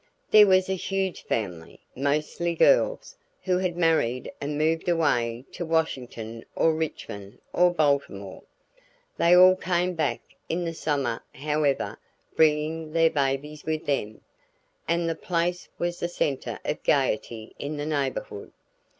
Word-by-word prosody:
There 210 -1 +8
was 185 -1 +4
a 190 - 0
huge 190 0 -2
family, 90 -7 -4 0.2
mostly 150 +5 -1
girls, - - +3 0.3
who 180 -1 +1
had 180 -2 -2
married 160 -8 +1
and 145 +1 -3
moved 160 +3 +1
away 125 -8 +1
to - - -5
Washington 125 -9 -2
or 165 - +3
Richmond 105 -10 -5 0.2
or 180 0 +4
Baltimore. 140 - -1 0.8
They 170 +1 +5
all 185 +1 +8
came 180 -1 0
back 160 -3 -1 0.3
in 175 +1 -1
the 165 - -3
summer 140 -7 -1
however 150 0 -1 0.4
bringing 155 0 +1
their 165 0 +4
babies 145 +2 -1
with 155 -1 -3
them, 110 -7 -2 0.7
and 170 0 +1
the 165 - 0
place 175 +1 -2
was 175 0 -2
the 170 - -1
center 140 -6 -2
of 150 - -2
gaiety 115 -5 0
in 150 +1 -4
the 145 - -3
neighborhood. 140 -8 -3
155 Hz, 135 wpm, -26 LUFS, 135-170 Hz, 0.8 s, There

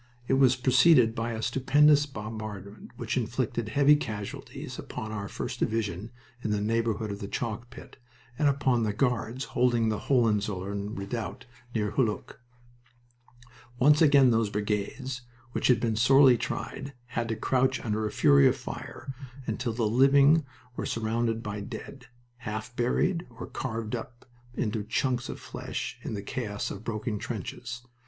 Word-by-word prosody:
It - - +1
was 130 -1 +5
preceded 125 -1 +5
by 115 0 -2
a 110 0 -4
stupendous 145 +4 +4
bombardment 110 -4 -7
which - - -2
inflicted 115 -2 -1
heavy 145 +5 +5
casualties 105 -8 -6
upon 110 0 -6
our 100 -2 -4
1st - - -5
Division 105 -2 -1 0.3
in - - -1
the 105 -1 +1
neighborhood 110 0 0
of 100 - -5
the 100 - -5
chalk 120 +2 -4
pit, 120 - -12 0.4
and 150 - +4
upon 135 -3 +2
the 105 -2 0
Guards 125 +1 0
holding 120 -3 +3
the 110 - -1
Hohenzollern 105 -4 0
redoubt 110 +4 -5 0.3
near 105 -2 0
Hulluch. 115 -6 -1 1.4
Once 150 +5 +5
again 140 -5 +6
those 115 -2 +2
brigades, 105 +6 -2 0.3
which - - 0
had 125 -4 +5
been 115 -2 0
sorely 130 +3 +6
tried, 140 +4 -4 0.2
had 115 -1 -2
to 115 - -1
crouch 130 +3 +1
under 110 -1 0
a - - -5
fury 70 -1 +6
of - - +2
fire, 135 +1 -7 0.3
until 115 +2 -2
the 115 0 -1
living 140 +6 +5 0.3
were - - -3
surrounded 115 0 -1
by 105 0 -4
dead, 125 +5 -8 0.3
half 110 0 -6
buried 165 +9 +1
or 115 0 -8
carved 115 -2 -4
up 120 +1 -8 0.3
into 105 -2 -1
chunks 120 +3 -1
of - - -6
flesh - - -5
in - - -4
the 100 - -5
chaos 105 -2 -3
of 100 - -7
broken 110 -1 -3
trenches. 115 +3 -6
115 Hz, 150 wpm, -28 LUFS, 105-130 Hz, 1.4 s, again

